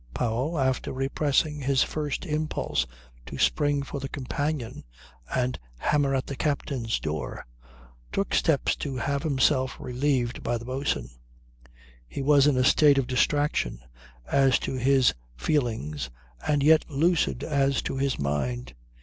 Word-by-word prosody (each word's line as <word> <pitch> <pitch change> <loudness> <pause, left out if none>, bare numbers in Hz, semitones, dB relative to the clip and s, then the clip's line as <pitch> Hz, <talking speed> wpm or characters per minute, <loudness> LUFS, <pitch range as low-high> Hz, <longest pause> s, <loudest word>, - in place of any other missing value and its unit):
Powell, 125 +8 -1
after 130 -2 0
repressing 145 +2 0
his 135 0 +3
first 150 +2 -3
impulse 150 - -1 0.4
to - - -7
spring 145 -1 +2
for 140 +1 -5
the 135 0 -5
companion 145 -1 -3 0.5
and 125 -1 0 0.2
hammer 140 - +1
at 130 - -1
the 140 - -5
captain's 135 -5 -1
door, 75 -1 -4 0.7
took 195 0 -1
steps 160 -5 +2
to 140 -3 -4
have 140 +2 -1
himself 135 -3 +1
relieved 125 -1 -1
by 120 - -1
the 115 - -9
boatswain. 130 - -2 1.0
He 135 - -5
was 145 0 +5
in 145 -3 +3
a 130 - +3
state 145 +1 +5
of 135 - +2
distraction 145 +4 +1 0.5
as 135 - +3
to - - -3
his 130 0 +3 0.2
feelings 75 - -1 0.4
and 145 -2 +2
yet 155 +2 +5
lucid 155 -3 +1
as 140 -3 +1
to - - -3
his 135 0 0
mind. 65 -4 -2
135 Hz, 140 wpm, -26 LUFS, 125-145 Hz, 1.0 s, was